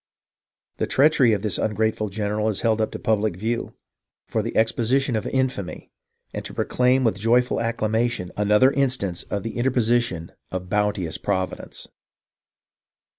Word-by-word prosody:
" - - -59
The - - 0
treachery 140 -4 +4
of 105 -2 0
this 105 - -1
ungrateful 110 0 0
general 105 +1 -1
is 105 - -2
held 110 -1 +2
up 110 - +1
to - - -3
pub 110 -2 +1
lic 110 -5 0
view, 115 +5 -3 0.5
for - - -1
the - - -4
exposition 120 +3 +2
of 110 - -2
infamy, 130 -8 -2 0.4
and - - -4
to - - -8
proclaim 125 +1 +2
with 110 -5 +1
joyful 120 +4 +2
acclamation, 115 -3 -1
another 105 +6 +4
instance 125 -11 0
of 100 -1 -4
the 115 +1 -5
interposition 120 -8 +1 0.2
of 90 -1 -5
bounteous 105 -6 0
Providence. 95 -2 -3
110 Hz, 150 wpm, -23 LUFS, 105-120 Hz, 0.5 s, treachery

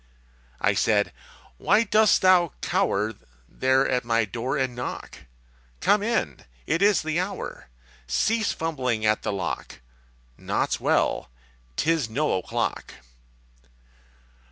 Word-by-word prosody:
I - - +2
said, 105 -1 +1 0.5
_Why 215 +3 +3
dost 215 -1 +4
thou 180 -3 +5
cower 110 - 0 0.3
There 130 - +2
at 125 -1 0
my 115 -1 +1
door 120 +7 -3
and 130 -2 -1
knock? 125 - -6 0.6
Come 205 - +3
in! 225 +2 -1 0.3
It 165 - 0
is 200 -3 +4
the 160 +2 -1
hour! 185 - -5 0.4
Cease 220 - +1
fumbling 125 -9 -2
at 110 0 +2
the - - -2
lock! 95 -8 -4 0.6
Naught's - - -1
well! - - +1 0.5
'Tis 160 - +1
no 150 +7 0
o'clock! 90 - -3
135 Hz, 115 wpm, -25 LUFS, 110-185 Hz, 0.6 s, thou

